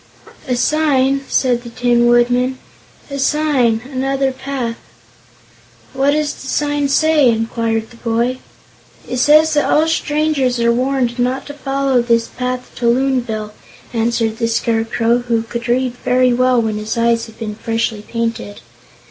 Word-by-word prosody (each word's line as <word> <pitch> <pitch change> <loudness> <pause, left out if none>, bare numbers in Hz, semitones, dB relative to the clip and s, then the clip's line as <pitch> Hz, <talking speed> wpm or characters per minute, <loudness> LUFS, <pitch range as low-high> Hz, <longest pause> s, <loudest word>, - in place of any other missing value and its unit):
"A 250 - 0
Sign," 275 -1 +2
said 245 -2 +1
the 240 - -9
Tin 240 0 +2
Woodman. 245 +2 +2 0.5
"A 280 - -4
Sign, 270 -6 +1
and 260 -1 -6
another 270 0 0
path." 260 -3 -4 1.2
"What 270 +1 +1
does 300 0 0
the 270 - -11
Sign 290 +1 0
say?" 305 -2 +4
inquired 225 0 -1
the 230 - -15
boy. 235 +2 -1 0.7
"It 250 - -3
says 305 +4 +5
that 295 - +1
'All 315 +1 +3
Strangers 300 -5 0
are 235 0 +3
Warned 250 -1 -1
not 250 +2 -1
to 290 - -8
Follow 275 -3 0
this 235 -1 +1
Path 250 0 -4
to 240 - 0
Loonville,'" 235 -4 0 0.4
answered 225 -1 0
the 230 - +1
Scarecrow, 230 +1 0
who 235 -2 -1
could 235 +1 -6
read 250 +1 +1
very 255 0 +3
well 255 0 +3
when 220 -2 -1
his 215 +2 -4
eyes 230 0 +1
had 225 - -15
been 215 -2 -5
freshly 225 0 -2
painted. 230 -2 -4
245 Hz, 150 wpm, -17 LUFS, 230-270 Hz, 1.2 s, says